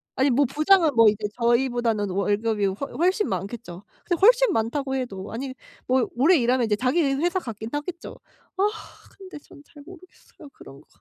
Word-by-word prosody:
아니 265 Hz, +2 st, +2 dB
뭐 275 Hz, +3 st, +3 dB
부장은 310 Hz, +3 st, +3 dB
뭐 230 Hz, -2 st, +7 dB
이제 210 Hz, 0 st, -3 dB
저희보다는 235 Hz, -3 st, +1 dB
월급이 205 Hz, +2 st, 0 dB
훨 200 Hz, +9 st, -5 dB
훨씬 370 Hz, +6 st, +1 dB
많겠죠. 200 Hz, -3 st, -6 dB, 0.2 s
근데 345 Hz, -2 st, -1 dB
훨씬 -, -, +5 dB
많다고 265 Hz, +5 st, -2 dB
해도 205 Hz, -7 st, -5 dB
아니 260 Hz, +3 st, -5 dB, 0.3 s
뭐 255 Hz, -1 st, +2 dB
오래 310 Hz, +8 st, +4 dB
일하면 245 Hz, 0 st, +1 dB
이제 215 Hz, -2 st, +1 dB
자기 260 Hz, +9 st, +1 dB
회사 310 Hz, +7 st, 0 dB
같긴 220 Hz, -, -7 dB
하겠죠. 315 Hz, +4 st, -6 dB, 0.4 s
아 385 Hz, -, +1 dB, 0.5 s
근데 380 Hz, -4 st, -11 dB
전 285 Hz, -, -17 dB
잘 290 Hz, -1 st, -16 dB
모르겠어요 365 Hz, -4 st, -16 dB
그런 135 Hz, -, -14 dB
거. -, -, -27 dB
260 Hz, 350 characters per minute, -24 LUFS, 225-310 Hz, 0.5 s, 뭐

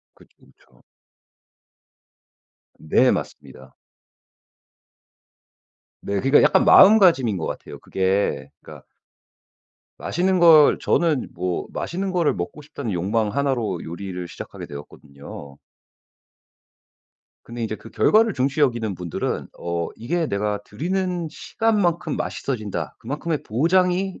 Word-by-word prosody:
그쵸, -, -, -23 dB
그쵸. 65 Hz, 0 st, -27 dB, 2.0 s
네. 80 Hz, -, +3 dB
맞습니다. 65 Hz, 0 st, -7 dB, 2.3 s
네. 100 Hz, -, -4 dB
그러니까 135 Hz, +2 st, +4 dB
약간 -, -, +4 dB
마음가짐인 180 Hz, -, +6 dB
것 80 Hz, -, -4 dB
같아요. -, -, -7 dB
그게 95 Hz, +1 st, -1 dB
그러니까 -, -, -13 dB, 1.1 s
맛있는 185 Hz, +2 st, 0 dB
걸 160 Hz, -4 st, +6 dB
저는 160 Hz, -6 st, +1 dB
뭐 90 Hz, 0 st, -3 dB
맛있는 190 Hz, +2 st, -3 dB
거를 175 Hz, -4 st, +2 dB
먹고 90 Hz, +12 st, -6 dB
싶다는 140 Hz, -6 st, -6 dB
욕망 105 Hz, +5 st, 0 dB
1 140 Hz, +3 st, 0 dB
로 110 Hz, -8 st, -3 dB
요리를 90 Hz, +1 st, -6 dB
시작하게 -, -, -9 dB
되었거든요. 70 Hz, -1 st, -11 dB, 1.9 s
근데 120 Hz, 0 st, -7 dB
이제 110 Hz, -, -3 dB
그 -, -, -14 dB
결과를 220 Hz, -1 st, +3 dB
중시 135 Hz, +3 st, -1 dB
여기는 120 Hz, -7 st, +1 dB
분들은 90 Hz, -3 st, -4 dB
어 85 Hz, -1 st, -3 dB
이게 165 Hz, +8 st, -2 dB
'내가 105 Hz, -2 st, -2 dB
들이는 180 Hz, -, -3 dB
시간만큼 190 Hz, -9 st, -1 dB
맛있어진다. 110 Hz, -7 st, -4 dB
그만큼의 150 Hz, +5 st, -4 dB
보장이 180 Hz, -, +1 dB
130 Hz, 255 characters per minute, -22 LUFS, -, 2.3 s, 마음가짐인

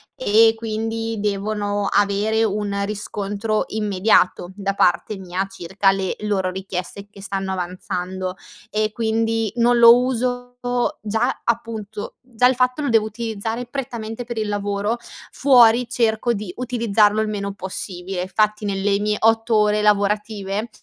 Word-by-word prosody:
e 225 Hz, -1 st, +4 dB
quindi 225 Hz, 0 st, -3 dB
devono 205 Hz, 0 st, -1 dB
avere 205 Hz, +2 st, +2 dB
un 205 Hz, -1 st, -1 dB
riscontro 205 Hz, +1 st, -2 dB
immediato 200 Hz, -3 st, +1 dB
da 195 Hz, -1 st, -2 dB
parte 200 Hz, +2 st, +1 dB
mia 185 Hz, 0 st, -3 dB
circa 195 Hz, +2 st, 0 dB
le 195 Hz, -1 st, -2 dB
loro 195 Hz, -3 st, 0 dB
richieste 190 Hz, +1 st, -6 dB
che 200 Hz, -1 st, -14 dB
stanno 195 Hz, -1 st, -3 dB
avanzando. 185 Hz, 0 st, -4 dB, 0.4 s
E 215 Hz, 0 st, 0 dB
quindi 225 Hz, -1 st, 0 dB
non 240 Hz, +1 st, +4 dB
lo 235 Hz, 0 st, +9 dB
uso 245 Hz, 0 st, -2 dB, 0.4 s
già 220 Hz, +4 st, -1 dB
appunto 220 Hz, -3 st, -3 dB
già 250 Hz, -1 st, +2 dB
il 255 Hz, -, +2 dB
fatto 255 Hz, +3 st, +1 dB
lo 285 Hz, -, -1 dB
devo 225 Hz, -2 st, +3 dB
utilizzare 225 Hz, +1 st, -4 dB
prettamente 240 Hz, -3 st, -5 dB
per 235 Hz, -1 st, -6 dB
il 215 Hz, -1 st, -1 dB
lavoro, 205 Hz, +2 st, -1 dB, 0.3 s
fuori 245 Hz, -3 st, +5 dB
cerco 235 Hz, -1 st, +1 dB
di 200 Hz, -3 st, -5 dB
utilizzarlo 225 Hz, -4 st, +2 dB
il 215 Hz, -, -1 dB
meno 200 Hz, -1 st, -3 dB
possibile. 185 Hz, -1 st, -5 dB
Infatti 210 Hz, +2 st, 0 dB
nelle 200 Hz, 0 st, 0 dB
mie 210 Hz, 0 st, 0 dB
8 225 Hz, +1 st, +3 dB
ore 210 Hz, 0 st, +3 dB
lavorative, 210 Hz, 0 st, 0 dB
210 Hz, 135 wpm, -21 LUFS, 200-225 Hz, 0.4 s, lo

